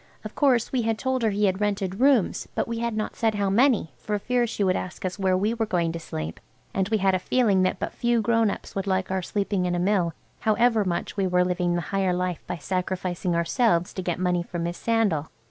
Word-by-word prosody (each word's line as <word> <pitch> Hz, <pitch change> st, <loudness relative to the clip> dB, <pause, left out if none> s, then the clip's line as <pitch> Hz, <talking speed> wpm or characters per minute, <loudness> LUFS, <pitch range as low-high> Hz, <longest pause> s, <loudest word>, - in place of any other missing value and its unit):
Of -, -, -7 dB
course 255 Hz, -5 st, +2 dB
we 255 Hz, -, +1 dB
had 225 Hz, -1 st, 0 dB
told 260 Hz, +1 st, -1 dB
her 225 Hz, -, +2 dB
he 205 Hz, +1 st, +1 dB
had 190 Hz, +1 st, 0 dB
rented 200 Hz, -1 st, -1 dB
rooms, 265 Hz, -6 st, +3 dB
but -, -, 0 dB
we 230 Hz, 0 st, -3 dB
had 235 Hz, -2 st, -2 dB
not 215 Hz, -, -3 dB
said 225 Hz, -2 st, +1 dB
how 200 Hz, -1 st, 0 dB
many, 230 Hz, -, +3 dB
for 210 Hz, -1 st, -2 dB
fear 245 Hz, +3 st, 0 dB
she 215 Hz, -2 st, -2 dB
should 185 Hz, -1 st, +2 dB
ask 185 Hz, -, -5 dB, 0.2 s
where 190 Hz, -1 st, +2 dB
we 210 Hz, +4 st, +1 dB
were 225 Hz, -2 st, -1 dB
going 170 Hz, -4 st, 0 dB
to 170 Hz, -, -5 dB
sleep, 80 Hz, -, -6 dB, 0.3 s
and 195 Hz, +1 st, 0 dB
we 220 Hz, -, +2 dB
had 195 Hz, -1 st, +2 dB
a 185 Hz, -, +2 dB
feeling 205 Hz, -2 st, +2 dB
that 185 Hz, +1 st, +1 dB
but -, -, -4 dB
few 240 Hz, -1 st, +1 dB
grown 230 Hz, 0 st, +2 dB
ups -, -, -6 dB
would 195 Hz, 0 st, -3 dB
like 190 Hz, -1 st, 0 dB
our 190 Hz, 0 st, 0 dB
sleeping 195 Hz, 0 st, -1 dB
in 175 Hz, -, 0 dB
a -, -, 0 dB
mill, 180 Hz, -3 st, +1 dB, 0.2 s
however 225 Hz, 0 st, +3 dB
much 180 Hz, +2 st, -3 dB
we 195 Hz, -1 st, +1 dB
were 180 Hz, 0 st, +3 dB
living 180 Hz, -1 st, 0 dB
the 175 Hz, -, 0 dB
higher 190 Hz, -2 st, +2 dB
life 180 Hz, -1 st, -2 dB
by 175 Hz, -, -3 dB
sacrificing 180 Hz, 0 st, -2 dB
ourselves 170 Hz, +1 st, +1 dB
to 185 Hz, -, -4 dB
get 175 Hz, -2 st, -2 dB
money 180 Hz, -1 st, +1 dB
for 175 Hz, 0 st, -6 dB
Miss 170 Hz, +1 st, -3 dB
Sandal. 210 Hz, -10 st, +1 dB
195 Hz, 240 wpm, -25 LUFS, 180-225 Hz, 0.3 s, rooms